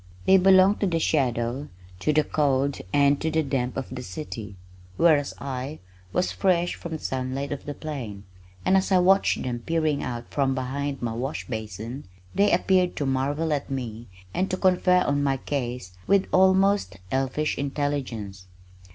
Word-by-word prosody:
They 190 Hz, -, +7 dB
belonged 190 Hz, +2 st, +5 dB
to 200 Hz, -, +1 dB
the 170 Hz, -2 st, +1 dB
shadow, 130 Hz, -3 st, 0 dB, 0.3 s
to 155 Hz, -, +1 dB
the 155 Hz, 0 st, +3 dB
cold 140 Hz, -2 st, +1 dB
and 140 Hz, +1 st, +3 dB
to 160 Hz, -, 0 dB
the 160 Hz, 0 st, +1 dB
damp 130 Hz, -3 st, -2 dB
of 130 Hz, -1 st, -5 dB
the 125 Hz, -, -5 dB
city, 105 Hz, -2 st, -7 dB, 0.4 s
whereas 155 Hz, -4 st, +3 dB
I 135 Hz, +2 st, -5 dB, 0.3 s
was 180 Hz, -, 0 dB
fresh 175 Hz, -2 st, +1 dB
from 170 Hz, -, -7 dB
the -, -, -2 dB
sunlight 130 Hz, 0 st, -3 dB
of 145 Hz, -, -5 dB
the 145 Hz, -1 st, -5 dB
plain, 120 Hz, -11 st, -6 dB, 0.4 s
and 190 Hz, -, +4 dB
as 190 Hz, +1 st, +2 dB
I 190 Hz, -, +6 dB
watched 190 Hz, +2 st, +3 dB
them 120 Hz, -2 st, -3 dB
peering 155 Hz, +2 st, 0 dB
out 120 Hz, -2 st, -5 dB
from 135 Hz, -2 st, +1 dB
behind 135 Hz, +1 st, -3 dB
my 115 Hz, -2 st, -1 dB
wash 130 Hz, +5 st, -4 dB
basin, 110 Hz, +2 st, -6 dB, 0.3 s
they 205 Hz, +1 st, +3 dB
appeared 180 Hz, 0 st, +2 dB
to 145 Hz, -, -2 dB
marvel 145 Hz, +4 st, 0 dB
at 145 Hz, -1 st, -3 dB
me 120 Hz, -4 st, -5 dB, 0.3 s
and 190 Hz, -, 0 dB
to 185 Hz, -, -1 dB
confer 180 Hz, -1 st, +3 dB
on 145 Hz, 0 st, +1 dB
my 135 Hz, -1 st, +1 dB
case 125 Hz, -7 st, -4 dB, 0.2 s
with 200 Hz, -1 st, +4 dB
almost 190 Hz, -, +3 dB
elfish 135 Hz, +3 st, 0 dB
intelligence. 130 Hz, -9 st, -3 dB
140 Hz, 170 wpm, -25 LUFS, 125-165 Hz, 0.4 s, They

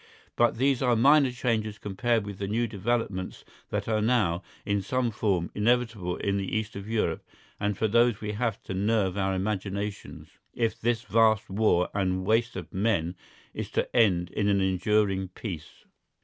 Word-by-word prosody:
But 120 Hz, -1 st, +3 dB
these 135 Hz, +1 st, +2 dB
are 125 Hz, -2 st, +3 dB
minor 140 Hz, +4 st, +5 dB
changes 115 Hz, -4 st, -1 dB
compared 110 Hz, +2 st, 0 dB
with 100 Hz, -2 st, -7 dB
the 100 Hz, -, -2 dB
new 115 Hz, +4 st, 0 dB
developments 105 Hz, -3 st, -2 dB, 0.2 s
that -, -, -2 dB
are 110 Hz, -1 st, +1 dB
now, 105 Hz, -7 st, +2 dB, 0.2 s
in 100 Hz, 0 st, 0 dB
some 125 Hz, +4 st, 0 dB
form, 95 Hz, -5 st, 0 dB
inevitable 110 Hz, -5 st, 0 dB
in 100 Hz, 0 st, -1 dB
the 100 Hz, +2 st, -1 dB
East 110 Hz, 0 st, -4 dB
of 100 Hz, +2 st, -7 dB
Europe, 110 Hz, -1 st, 0 dB, 0.4 s
and 100 Hz, -1 st, -1 dB
for 110 Hz, -, +1 dB
those 115 Hz, 0 st, +3 dB
we 105 Hz, -1 st, -4 dB
have 110 Hz, 0 st, -1 dB
to -, -, -5 dB
nerve 100 Hz, -1 st, +1 dB
our 95 Hz, -1 st, 0 dB
imaginations, 100 Hz, +1 st, -4 dB, 0.2 s
if 115 Hz, -2 st, -1 dB
this 115 Hz, 0 st, 0 dB
vast 110 Hz, -1 st, +3 dB
war 95 Hz, -3 st, +2 dB
and 95 Hz, -2 st, 0 dB
waste 115 Hz, +3 st, +1 dB
of 90 Hz, -4 st, -7 dB
men 95 Hz, -4 st, 0 dB, 0.4 s
is -, -, -5 dB
to -, -, -2 dB
end 90 Hz, -7 st, +3 dB
in 105 Hz, -, 0 dB
an 100 Hz, -1 st, +3 dB
enduring 95 Hz, +1 st, +1 dB
peace. 90 Hz, -4 st, -8 dB
105 Hz, 170 wpm, -27 LUFS, 95-115 Hz, 0.4 s, minor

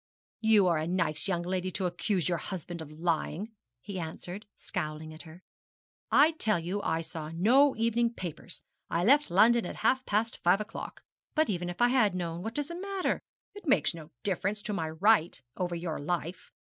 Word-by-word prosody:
'You 220 Hz, -3 st, +5 dB
are 170 Hz, -3 st, +3 dB
a 155 Hz, -, -2 dB
nice 165 Hz, -3 st, 0 dB
young 175 Hz, -3 st, 0 dB
lady 185 Hz, +1 st, -1 dB
to 190 Hz, -, -1 dB
accuse 180 Hz, +1 st, 0 dB
your 175 Hz, -2 st, 0 dB
husband 175 Hz, -1 st, -5 dB
of 155 Hz, -, -8 dB
lying,' 175 Hz, +4 st, -1 dB, 0.3 s
he 195 Hz, +3 st, -6 dB
answered, 175 Hz, +5 st, -6 dB
scowling 155 Hz, -3 st, -5 dB
at 155 Hz, -, -10 dB
her. 175 Hz, +4 st, -14 dB, 0.7 s
'I 305 Hz, +3 st, +6 dB
tell 215 Hz, -3 st, +2 dB
you 180 Hz, +5 st, -3 dB
I 160 Hz, -3 st, 0 dB
saw 160 Hz, -2 st, -6 dB
no 245 Hz, -, +4 dB
evening 230 Hz, +1 st, +1 dB
papers: 175 Hz, 0 st, -7 dB, 0.3 s
I 170 Hz, -, 0 dB
left 285 Hz, +6 st, +5 dB
London 225 Hz, +6 st, +5 dB
at -, -, -5 dB
half 260 Hz, 0 st, +3 dB
past 215 Hz, +2 st, 0 dB
five 180 Hz, +3 st, +4 dB
o'clock. 215 Hz, +1 st, -7 dB, 0.3 s
But 310 Hz, -6 st, +3 dB
even 175 Hz, -2 st, -2 dB
if 175 Hz, +7 st, -1 dB
I 240 Hz, -, +5 dB
had 225 Hz, -7 st, +3 dB
known, 170 Hz, -1 st, -3 dB
what 225 Hz, +4 st, -5 dB
does 290 Hz, +1 st, -1 dB
that 340 Hz, +1 st, -6 dB
matter? 395 Hz, -1 st, -1 dB, 0.3 s
It 410 Hz, -4 st, -11 dB
makes 175 Hz, -, +3 dB
no 160 Hz, -2 st, -10 dB
difference 200 Hz, +2 st, -1 dB
to 210 Hz, -, -2 dB
my 160 Hz, -5 st, -2 dB
right 175 Hz, +2 st, +3 dB, 0.2 s
over 175 Hz, -1 st, -2 dB
your 170 Hz, -2 st, -3 dB
life. 170 Hz, +3 st, -3 dB
185 Hz, 190 wpm, -30 LUFS, 170-225 Hz, 0.7 s, I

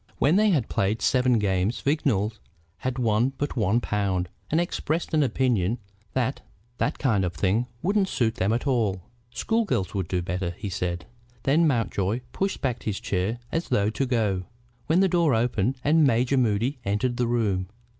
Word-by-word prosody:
When 150 Hz, +5 st, +3 dB
they 215 Hz, +1 st, +4 dB
had 150 Hz, -, +2 dB
played 100 Hz, +3 st, 0 dB
seven 125 Hz, -2 st, +3 dB
games 100 Hz, +1 st, 0 dB
Vignolles 115 Hz, -8 st, 0 dB, 0.4 s
had 130 Hz, -1 st, -3 dB
won 120 Hz, +2 st, +2 dB
but 145 Hz, -, -2 dB
one 110 Hz, -1 st, +2 dB
pound, 95 Hz, -5 st, -1 dB, 0.2 s
and 160 Hz, -, +2 dB
expressed 170 Hz, -2 st, -2 dB
an 155 Hz, -, +4 dB
opinion 125 Hz, -6 st, +1 dB, 0.4 s
that 130 Hz, +1 st, -1 dB, 0.4 s
that 145 Hz, -, 0 dB
kind 110 Hz, -9 st, +1 dB
of 90 Hz, -1 st, -1 dB
thing 100 Hz, +9 st, +1 dB, 0.2 s
wouldn't 195 Hz, +2 st, +2 dB
suit 115 Hz, -3 st, +1 dB
them 105 Hz, -3 st, 0 dB
at 120 Hz, +4 st, -1 dB
all. 110 Hz, -9 st, 0 dB, 0.3 s
"School 225 Hz, -, 0 dB
girls 95 Hz, -, -1 dB
would 95 Hz, -3 st, -2 dB
do 90 Hz, -1 st, -1 dB
better," 90 Hz, 0 st, -3 dB
he 100 Hz, -, -4 dB
said. 90 Hz, -2 st, -3 dB, 0.4 s
Then 160 Hz, +5 st, +4 dB
Mountjoy 115 Hz, -4 st, 0 dB
pushed 195 Hz, 0 st, -2 dB
back 125 Hz, -4 st, -1 dB
his 105 Hz, -3 st, -3 dB
chair 100 Hz, +4 st, -1 dB
as 165 Hz, +1 st, -2 dB
though 100 Hz, +1 st, +2 dB
to 135 Hz, -, -1 dB
go, 105 Hz, -7 st, 0 dB, 0.4 s
when 170 Hz, +4 st, +4 dB
the 195 Hz, -, +5 dB
door 170 Hz, -7 st, +3 dB
opened 115 Hz, +1 st, +1 dB
and 155 Hz, +2 st, +4 dB
Major 125 Hz, 0 st, +3 dB
Moody 125 Hz, +2 st, +1 dB
entered 115 Hz, +5 st, 0 dB
the 120 Hz, -, +1 dB
room. 105 Hz, -6 st, 0 dB
115 Hz, 175 wpm, -25 LUFS, 100-135 Hz, 0.4 s, the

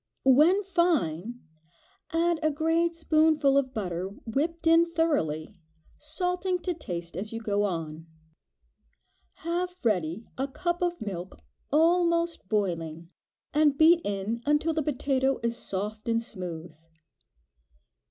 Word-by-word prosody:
When 310 Hz, +10 st, +5 dB
fine, 245 Hz, -, 0 dB, 0.7 s
add 335 Hz, 0 st, +1 dB
a 310 Hz, -, +2 dB
great 325 Hz, +3 st, +1 dB
spoonful 310 Hz, -3 st, +3 dB
of 275 Hz, -2 st, +2 dB
butter, 185 Hz, -6 st, -3 dB, 0.2 s
whipped 315 Hz, +9 st, -2 dB
in 330 Hz, +1 st, +5 dB
thoroughly, 290 Hz, -, 0 dB, 0.5 s
salting 360 Hz, +4 st, -1 dB
to 360 Hz, -, -1 dB
taste 175 Hz, -, -6 dB
as 205 Hz, +4 st, -4 dB
you 225 Hz, -, -4 dB
go 205 Hz, -2 st, 0 dB
on. 165 Hz, -3 st, -4 dB, 1.4 s
Have 355 Hz, +1 st, -1 dB
ready 190 Hz, -2 st, 0 dB
a 270 Hz, -, 0 dB
cup 345 Hz, +5 st, -2 dB
of 350 Hz, -1 st, 0 dB
milk 190 Hz, -3 st, -6 dB, 0.3 s
almost 335 Hz, -, +2 dB
boiling, 170 Hz, -5 st, -2 dB, 0.4 s
and 295 Hz, -2 st, +3 dB
beat 330 Hz, +2 st, +6 dB
in 205 Hz, +3 st, -3 dB
until 300 Hz, +2 st, +2 dB
the 315 Hz, -, 0 dB
potato 270 Hz, -2 st, 0 dB
is 235 Hz, 0 st, 0 dB
soft 210 Hz, +2 st, -4 dB
and 230 Hz, 0 st, +2 dB
smooth. 175 Hz, -7 st, -7 dB
275 Hz, 120 wpm, -27 LUFS, 195-330 Hz, 1.4 s, beat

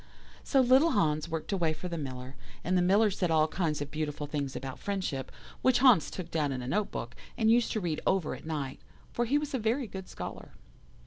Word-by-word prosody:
"So 270 Hz, -, +3 dB
little 265 Hz, +6 st, +5 dB
Hans 155 Hz, -4 st, +1 dB
worked 160 Hz, +3 st, -4 dB
away 170 Hz, -5 st, +1 dB
for 180 Hz, -, -6 dB
the 170 Hz, -, -4 dB
Miller, 130 Hz, -3 st, -6 dB, 0.3 s
and 185 Hz, +2 st, +1 dB
the 180 Hz, -, +4 dB
Miller 200 Hz, +4 st, +4 dB
said 185 Hz, -2 st, -1 dB
all 155 Hz, -1 st, +4 dB
kinds 155 Hz, -3 st, -1 dB
of 145 Hz, -, -10 dB
beautiful 150 Hz, -1 st, -3 dB
things 145 Hz, -2 st, -3 dB
about 130 Hz, 0 st, -6 dB
friendship, 185 Hz, -10 st, -3 dB, 0.3 s
which 255 Hz, -1 st, +4 dB
Hans 245 Hz, -, +5 dB
took 175 Hz, -3 st, -7 dB
down 150 Hz, -3 st, 0 dB
in 130 Hz, -2 st, -3 dB
a -, -, -6 dB
note 205 Hz, +10 st, 0 dB
book, 120 Hz, +1 st, -6 dB, 0.2 s
and 220 Hz, 0 st, +4 dB
used 235 Hz, 0 st, +3 dB
to 220 Hz, -, 0 dB
read 170 Hz, -5 st, -2 dB
over 190 Hz, -4 st, +1 dB
at -, -, -9 dB
night, 140 Hz, -4 st, -3 dB, 0.3 s
for 240 Hz, -, +1 dB
he 275 Hz, +5 st, +2 dB
was 295 Hz, -1 st, -3 dB
a 260 Hz, -, 0 dB
very 230 Hz, +5 st, 0 dB
good 190 Hz, -3 st, -8 dB
scholar. -, -, -7 dB
170 Hz, 220 wpm, -30 LUFS, 150-220 Hz, 0.3 s, little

